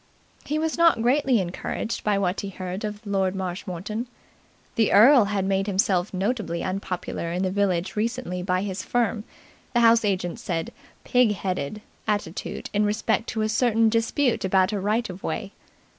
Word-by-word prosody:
He 300 - -1
was 320 +1 -1
not 335 -9 +5
greatly 260 -1 +3
encouraged 190 +5 -3
by 210 -1 +2
what 185 -1 0
he 200 - -5
heard 185 +1 -6
of 210 +1 -5
Lord 195 -2 0
Marshmoreton. 190 +4 -4 0.7
The 225 -2 +2
earl 235 +3 +7
had 200 -1 -1
made 195 +1 0
himself 190 -2 +1
notably 190 -3 -2
unpopular 185 -3 -3
in 180 +2 -1
the 185 - 0
village 190 -3 0
recently 220 -4 -2
by 185 +1 0
his 190 -2 -3
firm 230 -3 -1 0.5
the 240 - +4
house 230 0 +6
agent 190 0 -1
said 170 -8 -3 0.3
"pig 245 -4 +3
headed" 190 0 -3 0.2
attitude 205 -5 -3
in 210 0 +2
respect 210 +2 0
to 220 -2 -1
a 215 - 0
certain 225 -1 +3
dispute 230 +3 +1
about 190 +1 +3
a 205 - -1
right 215 +5 0
of 185 0 -9
way. 195 - -4
205 Hz, 165 wpm, -25 LUFS, 185-230 Hz, 0.7 s, earl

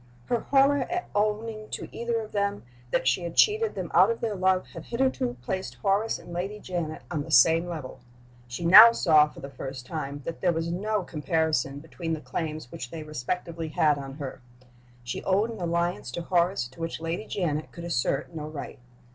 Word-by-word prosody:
Her 240 - 0
horror 275 +2 +4
at 360 0 -3
owning 215 +1 -1
to - - -5
either 235 -1 -1
of 215 - -9
them 200 0 -1 0.3
that 130 - 0
she 130 +6 +3
had 170 -1 -5
cheated 435 +1 +4
them 185 -4 -4
out 185 +5 +6
of 230 - -1
their 225 -2 -1
love 185 -1 +2
had - - -8
hitherto 235 - 0
placed 190 +8 -3
Horace 205 +3 +1
and 175 - -11
Lady 195 +4 -3
Janet 170 -5 -4
on 155 -4 -1
the 155 - -7
same 165 +5 +5
level. 155 -7 -6 0.5
She 120 +7 -5
now 215 +7 +11
saw 155 -8 +5
for - - -13
the 140 - -6
first 130 -1 -7
time 145 -1 -5
that 165 - -5
there 180 -2 +3
was 165 +1 -2
no 210 +3 -1
comparison 155 -3 0
between 165 +1 -5
the 160 - -2
claims 155 0 -5
which 120 - -6
they 160 +1 -6
respectively 160 +3 -4
had 150 -1 +2
on 135 -1 -7
her. 140 -3 -7 0.6
She 120 - -5
owned 205 +5 +1
an 215 - -9
allegiance 170 -4 -1
to 170 - -4
Horace 175 -5 +1
to 130 - -18
which 165 -1 -3
Lady 165 +6 -4
Janet 155 -5 -2
could 170 - -9
assert 150 -1 -1
no 155 -2 -5
right. 155 -4 -7
170 Hz, 195 wpm, -27 LUFS, 150-200 Hz, 0.6 s, now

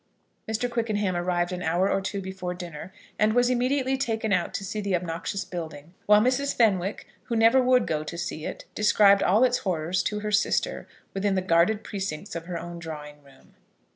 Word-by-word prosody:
Mr. 220 +3 0
Quickenham 215 -5 -1
arrived 175 0 0
an 180 0 -4
hour 175 +3 +1
or 195 - +1
two 195 +1 -3
before 185 -1 -5
dinner, 175 0 -8 0.3
and 215 +1 +3
was 245 +1 +3
immediately 260 +2 +1
taken 225 -5 -1
out 180 -2 +1
to 195 - -4
see 210 +3 -3
the 200 -2 0
obnoxious 175 +3 -3
building; 160 -2 -7
while 210 0 +7
Mrs. 260 +5 +1
Fenwick, 200 -4 +1 0.2
who 235 - -2
never 230 +4 +5
would 250 -1 +4
go 155 -1 -1
to 170 +2 -7
see 170 -2 -4
it, - - -6
described 205 -1 +5
all 210 +7 +4
its 250 -1 +3
horrors 175 -1 -1
to 210 0 -2
her 210 0 -3
sister 355 - 0 0.3
within 195 0 0
the 185 - +1
guarded 185 +5 +3
precincts 190 -8 -5
of 165 0 -6
her 175 -2 -3
own 170 +1 -7
drawing 150 -2 -8
room. 140 -1 -21
195 Hz, 195 wpm, -26 LUFS, 175-220 Hz, 0.3 s, while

